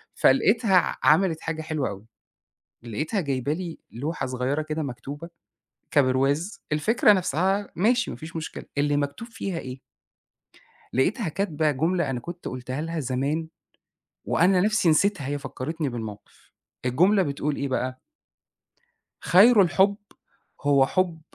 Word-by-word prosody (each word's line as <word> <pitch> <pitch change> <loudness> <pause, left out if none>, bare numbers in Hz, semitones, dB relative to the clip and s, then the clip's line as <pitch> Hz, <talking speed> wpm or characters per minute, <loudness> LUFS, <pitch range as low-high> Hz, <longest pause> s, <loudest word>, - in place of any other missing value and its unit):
فلقيتها 205 - +3
ع 180 - +1
عملت 165 -1 +3
حاجة 165 -1 -3
حلوة 155 -3 -2
أوي، 100 +1 -9 0.8
لقيتها 150 - -2
جايبة 140 -3 -1
لي 170 0 -5
لوحة 145 +8 -3
صغيرة 130 +4 -1
كده 155 +1 -3
مكتوبة 140 +4 -7 0.6
كبرواز، 140 +6 +1
الفكرة 210 +8 +4
نَفْسها 190 +2 0
ماشي، 235 +8 +2
ما - - -6
فيش 160 +1 -9
مشكلة، 160 - -6
اللي 145 0 +2
مكتوب 145 +10 -3
فيها 195 -6 -4
إيه؟ 130 -3 -7 1.1
لقيتها 185 - +1
كاتبة 160 -3 0
جملة 165 +3 0
أنا 125 -2 -3
كنت 175 +6 -7
قُلتها 130 +2 -5
لها 165 +1 -3
زمان 140 +5 -2 0.8
وأنا 180 +1 +3
نَفْسي 210 -2 +2
نسيتها، 160 -1 +2
هي 145 +1 -2
فكّرتني 150 +3 -4
بالموقف. 110 -4 -9 0.3
الجملة 180 +11 +4
بتقول 145 -2 -2
إيه 140 - -2
بقى؟ 130 0 -2 1.2
خير 205 - +6
الحُب 190 +3 +3 0.7
هو 140 -2 +4
حُب 175 0 0
155 Hz, 130 wpm, -25 LUFS, 135-185 Hz, 1.2 s, خير